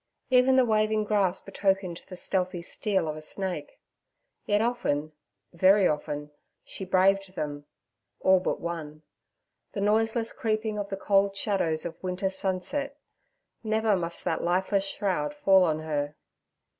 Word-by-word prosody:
Even 255 Hz, +1 st, +5 dB
the 260 Hz, -1 st, +5 dB
waving 215 Hz, -1 st, +2 dB
grass 200 Hz, -3 st, +1 dB
betokened 190 Hz, -3 st, -1 dB
the 185 Hz, -, -8 dB
stealthy 180 Hz, -1 st, -1 dB
steal 190 Hz, -2 st, -1 dB
of 155 Hz, -, -3 dB
a 155 Hz, -, -8 dB
snake. 190 Hz, -, -5 dB, 0.7 s
Yet 205 Hz, 0 st, +3 dB
often, 215 Hz, -11 st, 0 dB, 0.4 s
very 190 Hz, +3 st, +5 dB
often, 150 Hz, -1 st, -3 dB, 0.3 s
she 190 Hz, -, -7 dB
braved 190 Hz, +1 st, +2 dB
them—all 145 Hz, -, -2 dB
but 180 Hz, -, -2 dB
one—the 165 Hz, -, -9 dB
noiseless 225 Hz, +3 st, +1 dB
creeping 215 Hz, -1 st, -1 dB
of 200 Hz, -1 st, -4 dB
the 195 Hz, -, -3 dB
cold 195 Hz, 0 st, +2 dB
shadows 170 Hz, -7 st, 0 dB
of 170 Hz, -, -6 dB
winter's 185 Hz, +1 st, -2 dB
sunset: 195 Hz, +11 st, -3 dB, 0.7 s
never 220 Hz, -1 st, +2 dB
must 170 Hz, -2 st, -4 dB
that -, -, -1 dB
lifeless 190 Hz, +3 st, +1 dB
shroud 205 Hz, +10 st, -1 dB
fall 195 Hz, -10 st, +5 dB
on 155 Hz, -3 st, +1 dB
her. 145 Hz, -2 st, -2 dB
190 Hz, 130 wpm, -27 LUFS, 170-215 Hz, 0.7 s, Even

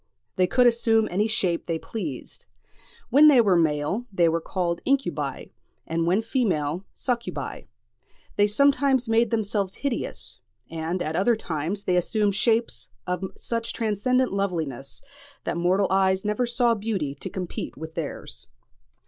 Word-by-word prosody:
They 185 Hz, -1 st, +3 dB
could 250 Hz, +7 st, +3 dB
assume 225 Hz, -2 st, +3 dB
any 205 Hz, +5 st, +1 dB
shape 185 Hz, -6 st, -1 dB
they 165 Hz, -1 st, 0 dB
pleased. 160 Hz, -, -7 dB, 0.6 s
When 290 Hz, +5 st, +8 dB
they 280 Hz, -4 st, +7 dB
were 200 Hz, -6 st, +4 dB
male, 165 Hz, +8 st, 0 dB
they 175 Hz, -3 st, +3 dB
were 165 Hz, 0 st, +1 dB
called 170 Hz, -1 st, -2 dB
incubi; 275 Hz, 0 st, -1 dB, 0.3 s
and 165 Hz, +1 st, -1 dB
when 190 Hz, +6 st, +2 dB
female, 185 Hz, -, -1 dB
succubi. 240 Hz, -2 st, -3 dB, 0.7 s
They 205 Hz, 0 st, +4 dB
sometimes 270 Hz, +2 st, +3 dB
made 225 Hz, +1 st, +3 dB
themselves 205 Hz, -3 st, -1 dB
hideous; 280 Hz, -4 st, -3 dB, 0.3 s
and 165 Hz, +2 st, -2 dB
at 155 Hz, +1 st, -3 dB
other 200 Hz, +7 st, +3 dB
times 180 Hz, 0 st, -4 dB
they 180 Hz, -, +1 dB
assumed 205 Hz, +3 st, +1 dB
shapes 225 Hz, +3 st, 0 dB, 0.2 s
of 180 Hz, +1 st, -2 dB
such 230 Hz, -1 st, -3 dB
transcendent 235 Hz, +3 st, +1 dB
loveliness, 160 Hz, -, -3 dB, 0.4 s
that -, -, -2 dB
mortal 180 Hz, +3 st, +2 dB
eyes 190 Hz, 0 st, +2 dB
never 210 Hz, +4 st, 0 dB
saw 240 Hz, 0 st, +3 dB
beauty 200 Hz, -10 st, -2 dB
to -, -, -5 dB
compete 180 Hz, -7 st, -5 dB
with 160 Hz, +2 st, -7 dB
theirs. 145 Hz, -, -6 dB
200 Hz, 140 wpm, -25 LUFS, 170-230 Hz, 0.7 s, When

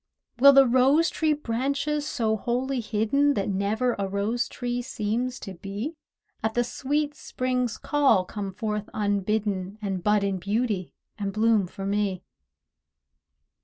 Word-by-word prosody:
Will 280 Hz, +2 st, +9 dB
the 275 Hz, 0 st, +8 dB
rose 265 Hz, +6 st, +4 dB
tree 315 Hz, -1 st, +1 dB
branches, 280 Hz, +3 st, -1 dB
so 220 Hz, -4 st, 0 dB
wholly 250 Hz, +4 st, -1 dB
hidden 235 Hz, +6 st, +1 dB
That 200 Hz, -, -1 dB
never 210 Hz, +6 st, 0 dB
a 200 Hz, -, 0 dB
rose 210 Hz, +5 st, -1 dB
tree 245 Hz, 0 st, -3 dB
seems 245 Hz, +1 st, -2 dB
to 195 Hz, -, -7 dB
be, 200 Hz, -, -5 dB, 0.5 s
At 220 Hz, 0 st, -1 dB
the 240 Hz, -, +3 dB
sweet 290 Hz, +4 st, -1 dB
Spring's 255 Hz, -4 st, -2 dB
call 270 Hz, -11 st, +3 dB
come 200 Hz, 0 st, -5 dB
forth 210 Hz, +1 st, -3 dB
unbidden, 205 Hz, -1 st, -1 dB
And 195 Hz, -4 st, -3 dB
bud 210 Hz, -1 st, +3 dB
in 195 Hz, -1 st, -1 dB
beauty, 205 Hz, -1 st, -1 dB, 0.2 s
and 200 Hz, -1 st, -2 dB
bloom 215 Hz, -2 st, +2 dB
for 195 Hz, +2 st, -7 dB
me? 200 Hz, -2 st, -1 dB
220 Hz, 140 wpm, -26 LUFS, 200-255 Hz, 0.5 s, Will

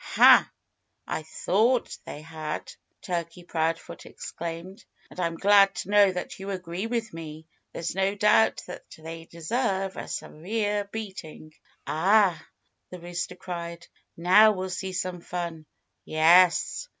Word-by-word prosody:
"Ha! -, -, +6 dB, 0.5 s
I -, -, -3 dB
thought 220 Hz, +10 st, +1 dB
they 150 Hz, -, -8 dB
had," 155 Hz, -1 st, -6 dB, 0.3 s
Turkey 175 Hz, -1 st, -4 dB
Proudfoot 165 Hz, -1 st, -3 dB
exclaimed. 170 Hz, +5 st, -7 dB, 0.3 s
"And -, -, -11 dB
I'm 170 Hz, -2 st, -1 dB
glad 200 Hz, 0 st, +5 dB
to 200 Hz, -, -5 dB
know 205 Hz, -2 st, +6 dB
that 180 Hz, +1 st, -6 dB
you 195 Hz, +1 st, -6 dB
agree 180 Hz, +1 st, -4 dB
with 230 Hz, -3 st, -3 dB
me. 160 Hz, -1 st, -8 dB, 0.3 s
There's 165 Hz, -, -4 dB
no 195 Hz, +2 st, 0 dB
doubt 210 Hz, +2 st, +3 dB
that 180 Hz, -, -9 dB
they 165 Hz, +1 st, -9 dB
deserve 190 Hz, +3 st, -2 dB
a -, -, -6 dB
severe 205 Hz, +4 st, -2 dB
beating." 190 Hz, -8 st, -8 dB, 0.3 s
"Ah!" 185 Hz, +1 st, +3 dB, 0.5 s
the 180 Hz, -, -9 dB
rooster 175 Hz, 0 st, -5 dB
cried. 170 Hz, -1 st, -7 dB, 0.3 s
"Now 185 Hz, +6 st, +6 dB
we'll 185 Hz, -1 st, -4 dB
see 190 Hz, +1 st, -4 dB
some 180 Hz, -1 st, -3 dB
fun." 170 Hz, -3 st, -5 dB, 0.4 s
"Yes!" 170 Hz, -, +4 dB
180 Hz, 130 wpm, -26 LUFS, 165-200 Hz, 0.5 s, Ha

